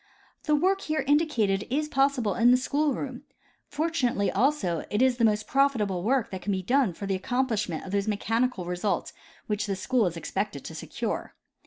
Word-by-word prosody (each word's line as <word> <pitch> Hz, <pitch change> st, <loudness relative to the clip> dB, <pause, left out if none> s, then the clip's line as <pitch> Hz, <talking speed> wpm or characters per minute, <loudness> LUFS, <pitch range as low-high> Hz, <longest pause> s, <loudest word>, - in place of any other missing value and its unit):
The 300 Hz, -2 st, +3 dB
work 380 Hz, +6 st, +2 dB
here 310 Hz, -4 st, -1 dB
indicated 245 Hz, -10 st, +2 dB
is 300 Hz, +4 st, 0 dB
possible 270 Hz, -7 st, +1 dB
in 235 Hz, +1 st, +4 dB
the 250 Hz, -, +6 dB
school 285 Hz, +2 st, 0 dB
room; 260 Hz, -3 st, -5 dB, 0.5 s
fortu 320 Hz, -3 st, 0 dB
nately 200 Hz, -5 st, +1 dB
also 205 Hz, -, +1 dB
it 210 Hz, -, 0 dB
is 255 Hz, -1 st, +3 dB
the 235 Hz, -, 0 dB
most 215 Hz, -1 st, +2 dB
profitable 230 Hz, -10 st, +1 dB
work 245 Hz, +5 st, +1 dB
that 190 Hz, -1 st, -5 dB
can 205 Hz, -, -2 dB
be 190 Hz, -1 st, -1 dB
done 250 Hz, -2 st, +2 dB
for 200 Hz, -, -7 dB
the 195 Hz, -, -1 dB
accomplishment 215 Hz, -4 st, -1 dB
of 190 Hz, -, -7 dB
those 200 Hz, +1 st, 0 dB
mechanical 225 Hz, 0 st, 0 dB
results 180 Hz, +1 st, -2 dB, 0.3 s
which 210 Hz, 0 st, -2 dB
the 195 Hz, -, -1 dB
school 220 Hz, +3 st, +1 dB
is 170 Hz, -1 st, -4 dB
expected 180 Hz, -4 st, -3 dB
to -, -, -7 dB
secure. -, -, -4 dB
230 Hz, 190 wpm, -27 LUFS, 195-275 Hz, 0.5 s, the